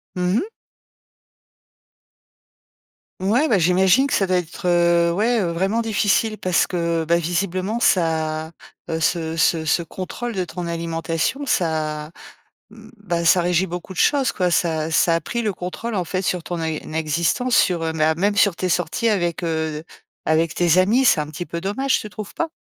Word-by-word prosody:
Mmh 180 Hz, +2 st, +1 dB
mh. 380 Hz, -, -1 dB, 2.7 s
Ouais, 225 Hz, +11 st, +2 dB
bah, 220 Hz, -, +3 dB
j'imagine 185 Hz, +8 st, +4 dB
que 280 Hz, -, -2 dB
ça 195 Hz, -, +2 dB
doit 185 Hz, 0 st, +2 dB
être, 180 Hz, +1 st, -4 dB
heu, 170 Hz, -1 st, +3 dB
ouais, 225 Hz, +7 st, +1 dB
heu, 175 Hz, -, -1 dB
vraiment 190 Hz, +7 st, 0 dB
difficile 215 Hz, 0 st, +1 dB
parce 185 Hz, -3 st, +1 dB
que, 170 Hz, -2 st, -1 dB
bah, 170 Hz, +2 st, +3 dB
visiblement 185 Hz, +5 st, -2 dB
ça, 160 Hz, -5 st, +1 dB, 0.4 s
heu, 160 Hz, -, -1 dB
ce 160 Hz, 0 st, 0 dB
ce 165 Hz, -1 st, +2 dB
ce 155 Hz, +3 st, +2 dB
contrôle 190 Hz, +8 st, -6 dB
de 185 Hz, -1 st, -1 dB
ton 175 Hz, 0 st, -6 dB
alimentation, 165 Hz, -, -2 dB
ça, 155 Hz, -5 st, -1 dB, 0.6 s
bah, 210 Hz, -6 st, -5 dB
ça 180 Hz, +2 st, +5 dB
régit 175 Hz, +1 st, +1 dB
beaucoup 175 Hz, +2 st, -7 dB
de 185 Hz, -, -9 dB
choses, 275 Hz, -5 st, +3 dB
quoi, 180 Hz, -5 st, 0 dB
ça 160 Hz, -2 st, 0 dB
ça 165 Hz, +1 st, +3 dB
a -, -, +1 dB
pris 235 Hz, +7 st, -4 dB
le 215 Hz, -2 st, 0 dB
contrôle 195 Hz, +5 st, -5 dB
en 185 Hz, -3 st, -1 dB
fait 185 Hz, +2 st, -2 dB
sur 180 Hz, -2 st, -2 dB
ton 175 Hz, -1 st, -4 dB
é 160 Hz, -1 st, -2 dB, 0.2 s
existence, 170 Hz, -, +1 dB
sur, 175 Hz, -3 st, +2 dB
heu, 160 Hz, -, -1 dB
bah, 160 Hz, 0 st, +1 dB
même 205 Hz, +4 st, 0 dB
sur 200 Hz, -3 st, +4 dB
tes 185 Hz, +1 st, -2 dB
sorties 180 Hz, +6 st, 0 dB
avec, 175 Hz, -5 st, -1 dB
heu, 160 Hz, -2 st, -2 dB, 0.4 s
avec 160 Hz, +1 st, +1 dB
tes 175 Hz, -1 st, +3 dB
amis, 210 Hz, +8 st, +4 dB
c'est 215 Hz, -, +4 dB
un 150 Hz, -, -2 dB
petit 155 Hz, +3 st, -6 dB
peu 170 Hz, -, -5 dB
dommage, 240 Hz, +9 st, 0 dB
tu 215 Hz, -, -7 dB
trouves 210 Hz, -1 st, -8 dB
pas? 335 Hz, -, -1 dB
175 Hz, 180 wpm, -21 LUFS, 165-205 Hz, 2.7 s, ça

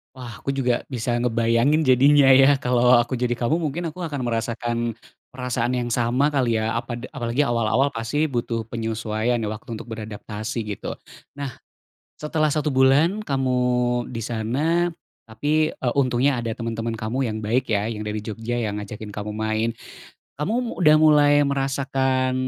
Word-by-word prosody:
Wah, 120 Hz, -3 st, -9 dB
aku 135 Hz, 0 st, -3 dB
juga 125 Hz, -3 st, 0 dB
bisa 120 Hz, -2 st, -2 dB
ngebayangin 120 Hz, +6 st, +2 dB
jadinya 135 Hz, +1 st, +5 dB
ya 135 Hz, +2 st, +7 dB
kalau 125 Hz, -1 st, +3 dB
aku 120 Hz, +1 st, +1 dB
jadi 120 Hz, -1 st, 0 dB
kamu 125 Hz, +9 st, 0 dB
mungkin 165 Hz, +1 st, -3 dB
aku 180 Hz, -, -13 dB
akan 145 Hz, -4 st, -4 dB
merasakan, 120 Hz, 0 st, -2 dB, 0.5 s
perasaan 125 Hz, -1 st, -2 dB
yang 120 Hz, -1 st, -2 dB
sama 125 Hz, +6 st, +1 dB
kali 125 Hz, -5 st, +1 dB
ya. 110 Hz, +1 st, -1 dB
Apada 120 Hz, +1 st, -4 dB
apalagi 120 Hz, +4 st, 0 dB
awal-awal 120 Hz, +2 st, +1 dB
pasti 115 Hz, +7 st, -1 dB
butuh 120 Hz, -4 st, -2 dB
penyesuaian, 115 Hz, +1 st, -1 dB
waktu 110 Hz, +2 st, -5 dB
untuk -, -, -10 dB
beradaptasi, 110 Hz, +1 st, -5 dB
gitu. 105 Hz, -2 st, -5 dB, 0.4 s
Nah, 140 Hz, -2 st, -4 dB, 0.6 s
setelah 155 Hz, 0 st, 0 dB
1 150 Hz, -1 st, 0 dB
bulan 140 Hz, +10 st, +3 dB
kamu 130 Hz, -2 st, 0 dB, 0.6 s
di 115 Hz, -, -4 dB
sana, 140 Hz, +11 st, 0 dB, 0.4 s
tapi, 150 Hz, +7 st, 0 dB
e 130 Hz, -, -5 dB
untungnya 130 Hz, 0 st, +2 dB
ada 115 Hz, -1 st, -3 dB
teman-teman 115 Hz, -1 st, -3 dB
kamu 120 Hz, +5 st, -2 dB
yang 110 Hz, 0 st, -3 dB
baik 120 Hz, +5 st, 0 dB
ya, 105 Hz, +2 st, 0 dB
yang 105 Hz, -1 st, -5 dB
dari 105 Hz, 0 st, -3 dB
Jogja 115 Hz, +2 st, -4 dB
yang 105 Hz, -3 st, -2 dB
ngajakin 105 Hz, +1 st, -8 dB
kamu 105 Hz, +1 st, -5 dB
main. 110 Hz, +1 st, 0 dB, 0.7 s
Kamu 185 Hz, +9 st, 0 dB
mu 245 Hz, -2 st, -2 dB
udah 155 Hz, -2 st, +7 dB
mulai 150 Hz, -2 st, +5 dB
merasakan 135 Hz, -1 st, 0 dB
125 Hz, 155 wpm, -23 LUFS, 115-140 Hz, 0.7 s, ya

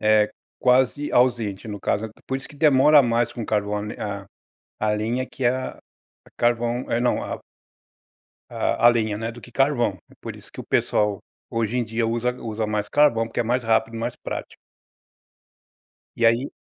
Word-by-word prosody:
eh, 105 Hz, 0 st, +4 dB, 0.3 s
quase 130 Hz, +3 st, +2 dB
ausente 115 Hz, -5 st, +1 dB
no 105 Hz, -1 st, -5 dB
caso 105 Hz, +3 st, -1 dB
é -, -, -9 dB, 0.2 s
por 130 Hz, -, -1 dB
isso 135 Hz, -, -10 dB
que 145 Hz, -, -14 dB
demora 145 Hz, 0 st, +6 dB
mais 120 Hz, 0 st, +1 dB
com 115 Hz, -, -5 dB
carvão, 105 Hz, -1 st, -1 dB
a 100 Hz, -2 st, -5 dB, 0.5 s
a 105 Hz, 0 st, +1 dB
lenha 110 Hz, +4 st, 0 dB
é 130 Hz, -, -5 dB
que 135 Hz, -, -6 dB
é 120 Hz, -, +5 dB
a 130 Hz, -, -5 dB, 0.6 s
carvão, 120 Hz, +1 st, 0 dB
é 115 Hz, -, +1 dB
não 125 Hz, -, +1 dB
a -, -, -5 dB, 1.1 s
a 120 Hz, -, +1 dB
a -, -, +11 dB
lenha, 110 Hz, -3 st, +1 dB
né, 115 Hz, +2 st, -3 dB
do 120 Hz, -, -12 dB
que -, -, -13 dB
carvão 120 Hz, -8 st, +1 dB
é -, -, -18 dB
por -, -, -7 dB
isso -, -, -14 dB
que -, -, -8 dB
o -, -, -8 dB
pessoal 105 Hz, -2 st, +1 dB, 0.3 s
hoje 115 Hz, +1 st, -1 dB
em 120 Hz, -, +1 dB
dia 115 Hz, +1 st, -1 dB
usa 120 Hz, +2 st, 0 dB
usa 110 Hz, -1 st, -2 dB
mais 105 Hz, -1 st, -2 dB
carvão 130 Hz, -6 st, +3 dB
porque -, -, -3 dB
é -, -, +3 dB
mais 125 Hz, +2 st, 0 dB
rápido 115 Hz, 0 st, +2 dB
e 115 Hz, -, -4 dB
mais 120 Hz, +1 st, -3 dB
prático. -, -, -6 dB, 1.6 s
E 115 Hz, -, 0 dB
aí 115 Hz, +4 st, +3 dB
115 Hz, 190 wpm, -23 LUFS, 110-125 Hz, 1.6 s, a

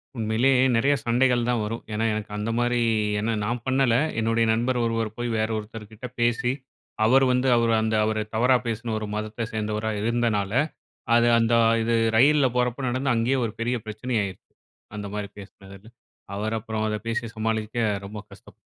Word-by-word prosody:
உண்மையிலே 115 Hz, +3 st, +1 dB, 0.2 s
நெறைய 135 Hz, +5 st, +3 dB
சண்டைகள் 120 Hz, 0 st, +2 dB
தான் 120 Hz, -3 st, +1 dB
வரும். 115 Hz, +2 st, -4 dB
ஏன்னா 110 Hz, +1 st, -1 dB
எனக்கு 105 Hz, -1 st, -5 dB
அந்த 105 Hz, +2 st, -3 dB
மாரி 120 Hz, 0 st, +1 dB, 0.4 s
ஏன்னா 115 Hz, +2 st, -1 dB
நான் 120 Hz, +2 st, -2 dB
பண்ணல, 130 Hz, -3 st, +3 dB, 0.2 s
என்னுடைய 115 Hz, +1 st, +2 dB
நண்பர் 120 Hz, +2 st, 0 dB
ஒருவர் 115 Hz, -1 st, -2 dB
போய் 120 Hz, 0 st, -2 dB
வேற 110 Hz, +1 st, 0 dB
ஒருத்தர் 105 Hz, 0 st, -8 dB
கிட்ட 110 Hz, +3 st, -10 dB
பேசி, 120 Hz, +1 st, +1 dB, 0.5 s
அவர் 135 Hz, +4 st, +5 dB
வந்து 125 Hz, +1 st, +1 dB
அவரு 115 Hz, -1 st, +2 dB
அந்த 110 Hz, 0 st, 0 dB
அவர 110 Hz, 0 st, -1 dB, 0.2 s
தவறா 125 Hz, +3 st, +4 dB
பேசின 115 Hz, 0 st, -3 dB
ஒரு 110 Hz, -, -5 dB
மதத்தை 110 Hz, +2 st, -4 dB
சேந்தவரா 110 Hz, 0 st, -2 dB
இருந்தனால, 110 Hz, -3 st, 0 dB, 0.6 s
அது 120 Hz, 0 st, +5 dB
அந்த 115 Hz, 0 st, +1 dB, 0.3 s
இது 115 Hz, +1 st, 0 dB, 0.2 s
ரயில்ல 140 Hz, +2 st, +5 dB
போகிறப்போ 125 Hz, +1 st, 0 dB
நடந்து, 130 Hz, +1 st, 0 dB
அங்கேயே 120 Hz, +4 st, +1 dB
ஒரு 110 Hz, -, -3 dB
பெரிய 120 Hz, +2 st, 0 dB
பிரச்சனை 110 Hz, +4 st, -4 dB
ஆயிருச்சு 95 Hz, -, -5 dB, 0.6 s
அந்த 105 Hz, -1 st, -5 dB
மாரி 105 Hz, -1 st, -4 dB
பேசினதில. 100 Hz, +1 st, -14 dB, 0.5 s
அவர் 110 Hz, +2 st, -2 dB
அப்புறம் 110 Hz, 0 st, -3 dB
அதை 105 Hz, 0 st, -2 dB
பேசி 115 Hz, +1 st, -2 dB
சமாளிக்க 110 Hz, 0 st, -2 dB, 0.3 s
ரொம்ப 105 Hz, +2 st, -8 dB
கஷ்டப் -, -, -15 dB
115 Hz, 165 wpm, -25 LUFS, 110-120 Hz, 0.6 s, அவர்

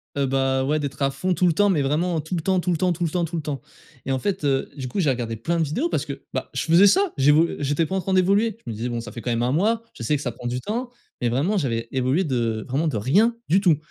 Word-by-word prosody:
Heu, 140 Hz, -1 st, +1 dB
bah, 135 Hz, 0 st, +1 dB
ouais, 150 Hz, +3 st, +1 dB
d'être 140 Hz, -1 st, -5 dB
à 135 Hz, 0 st, +2 dB
fond, 180 Hz, +7 st, -1 dB
tout 180 Hz, -, +1 dB
le 170 Hz, -, +4 dB
temps, 205 Hz, +4 st, +3 dB
mais 160 Hz, -7 st, +2 dB
vraiment, 160 Hz, +4 st, 0 dB
tout 170 Hz, +4 st, -4 dB
le 165 Hz, -, -1 dB
temps, 190 Hz, +1 st, +1 dB
tout 180 Hz, 0 st, -1 dB
le 165 Hz, -, +1 dB
temps, 180 Hz, +2 st, +1 dB
tout 175 Hz, +1 st, -4 dB
le 165 Hz, -, +1 dB
temps, 175 Hz, 0 st, 0 dB
tout 170 Hz, +2 st, -6 dB
le 160 Hz, -, -1 dB
temps 140 Hz, -2 st, -4 dB, 0.4 s
et 135 Hz, -, -2 dB
en 130 Hz, -, 0 dB
fait, 195 Hz, -2 st, -2 dB
heu, 135 Hz, -1 st, +1 dB
du 130 Hz, -2 st, -4 dB
coup, 195 Hz, -, -3 dB
j'ai 155 Hz, -6 st, +2 dB
regardé 120 Hz, -3 st, -2 dB
plein 165 Hz, +10 st, -1 dB
de -, -, +3 dB
vidéos 260 Hz, -, -1 dB
parce -, -, -1 dB
que, -, -, -7 dB
bah, -, -, -3 dB
je -, -, -1 dB
faisais 170 Hz, +5 st, +6 dB
ça. 385 Hz, -, +3 dB
J'évol 150 Hz, +5 st, +4 dB
j'étais 145 Hz, +3 st, +1 dB
pas 190 Hz, -, -3 dB
en 190 Hz, -, 0 dB
train 190 Hz, +2 st, -2 dB
d'évoluer. 200 Hz, +4 st, +2 dB
Je 115 Hz, -, -4 dB
me -, -, -5 dB
disais: 115 Hz, +3 st, -3 dB
«Bon, 120 Hz, -1 st, -3 dB
ça 115 Hz, -2 st, -9 dB
fait 115 Hz, -, -8 dB
quand 125 Hz, -, -4 dB
même 115 Hz, +1 st, 0 dB
1 125 Hz, -, +1 dB
mois». 220 Hz, +9 st, +1 dB
Je -, -, -11 dB
sais 150 Hz, +6 st, +1 dB
que 145 Hz, -, -3 dB
ça 125 Hz, -, -2 dB
prend 120 Hz, +1 st, -7 dB
du 125 Hz, +1 st, -2 dB
temps, 240 Hz, +4 st, -3 dB, 0.3 s
mais 120 Hz, -, +1 dB
vraiment, 160 Hz, -, +1 dB
j'avais 115 Hz, -7 st, -1 dB
évolué 130 Hz, +7 st, +1 dB
de 115 Hz, -6 st, -1 dB
vraiment 150 Hz, +5 st, 0 dB
de 145 Hz, -, -1 dB
rien 205 Hz, -, +3 dB
du 190 Hz, +4 st, +5 dB
tout 170 Hz, -7 st, +4 dB
150 Hz, 315 wpm, -23 LUFS, 130-185 Hz, 0.4 s, faisais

